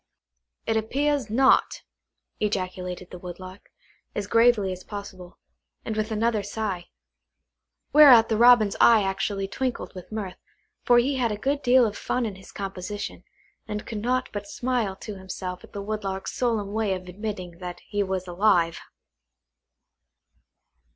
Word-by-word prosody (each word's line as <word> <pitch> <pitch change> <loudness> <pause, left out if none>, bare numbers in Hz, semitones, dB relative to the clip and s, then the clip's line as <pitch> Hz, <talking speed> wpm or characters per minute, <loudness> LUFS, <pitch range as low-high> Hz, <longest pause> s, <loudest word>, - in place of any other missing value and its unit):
"It 225 - 0
appears 275 +3 0
not," 260 +4 +3 0.6
ejaculated 185 -3 -3
the 180 - -8
Woodlark, 185 +2 -10 0.5
as 205 - -2
gravely 230 -3 +4
as 185 0 -7
possible, 195 -3 -9 0.5
and 220 - -3
with 215 0 -1
another 220 0 +1
sigh; 200 -3 -4 1.1
whereat 265 -7 +9
the 220 - 0
Robin's 235 -2 +6
eye 225 -3 +7
actually 195 0 -2
twinkled 255 +5 -3
with 185 0 -10
mirth, 200 -4 -5 0.4
for 245 - +4
he 265 +3 +2
had 240 -3 +1
a 210 - -3
good 280 +6 -1
deal 250 -1 +5
of 210 -2 -2
fun 250 - -1
in 215 - -3
his 190 0 -14
composition, 195 +1 -6 0.4
and 210 0 -4
could 215 -2 -5
not 255 +3 0
but 205 -1 -5
smile 235 -3 -1
to 200 0 -8
himself 185 -1 -6
at - - -15
the 200 - -6
Woodlark's 200 -2 -4
solemn 220 -5 -1
way 215 -3 0
of 185 0 -9
admitting 185 -3 -6
that 180 -1 -7
he 205 -1 -1
was 190 -2 -2
alive. 175 -2 +2
205 Hz, 145 wpm, -25 LUFS, 190-230 Hz, 1.1 s, whereat